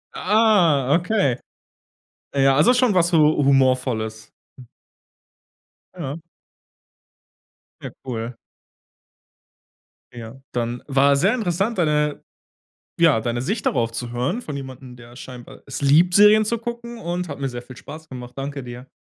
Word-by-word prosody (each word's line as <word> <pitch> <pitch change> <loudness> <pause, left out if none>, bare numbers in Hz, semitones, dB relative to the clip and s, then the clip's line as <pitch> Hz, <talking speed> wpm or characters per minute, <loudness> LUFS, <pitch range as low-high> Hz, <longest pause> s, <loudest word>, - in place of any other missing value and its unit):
Ah, 180 - +3
okay. 180 - 0 1.0
Ja, 135 -1 +3
also 160 - +5
schon 245 -2 +3
was 175 -2 +2
hu 155 -2 +4
humorvolles. 130 -5 +1 1.7
Ja. 145 -3 -5 1.6
Ja, - - -7
cool. 115 -1 -5 1.8
Ja, 120 +2 -10
dann 120 0 -3
war 140 0 +3
sehr 185 +10 +2
interessant, 210 -1 -1
deine 150 -3 0 0.8
ja, 155 -10 +4
deine 120 0 -2
Sicht 205 - -3
darauf 115 -4 0
zu 120 +1 -5
hören 125 - -2
von 150 -10 -6
jemandem, 130 -2 -10
der 120 0 -15
scheinbar 125 -1 -11
es 135 - -6
liebt, 155 +6 +4
Serien 210 +1 +6
zu 235 +2 -1
gucken, 235 +1 -7
und 175 -3 -4
hat 140 - -7
mir 135 - -2
sehr 120 -1 -6
viel 125 0 -13
Spaß 160 +1 -11
gemacht. 125 -1 -9
Danke 140 0 -5
dir. 125 +1 -10
140 Hz, 130 wpm, -21 LUFS, 125-180 Hz, 1.8 s, Serien